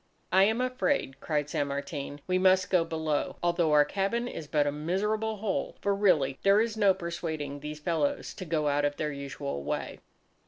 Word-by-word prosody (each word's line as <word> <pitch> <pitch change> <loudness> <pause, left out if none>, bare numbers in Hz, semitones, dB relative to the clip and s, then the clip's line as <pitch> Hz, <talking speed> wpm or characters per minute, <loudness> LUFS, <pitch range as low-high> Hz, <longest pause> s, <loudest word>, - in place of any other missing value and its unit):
"I 190 +2 +6
am 220 +4 +1
afraid," 255 - 0
cried 150 -2 -1
San 145 -1 -1
Martin, 140 0 -5
"we 185 0 +1
must 185 0 +4
go 180 -3 +4
below, 160 -2 -2
although 170 -2 +2
our 150 -1 +6
cabin 200 +8 -1
is 160 -10 -6
but 150 -1 +2
a 145 - +1
miserable 210 +9 -1
hole! 205 -1 -2
For 200 - +1
really 165 -10 +2
there 200 +1 +5
is 225 0 0
no 200 -3 +4
persuading 160 -5 -4
these 150 +1 -6
fellows 155 -2 -1
to 185 - -7
go 155 -2 0
out 145 0 +1
of 145 0 0
their 150 -1 -1
usual 140 - -5
way." - - -3
165 Hz, 190 wpm, -29 LUFS, 145-195 Hz, -, I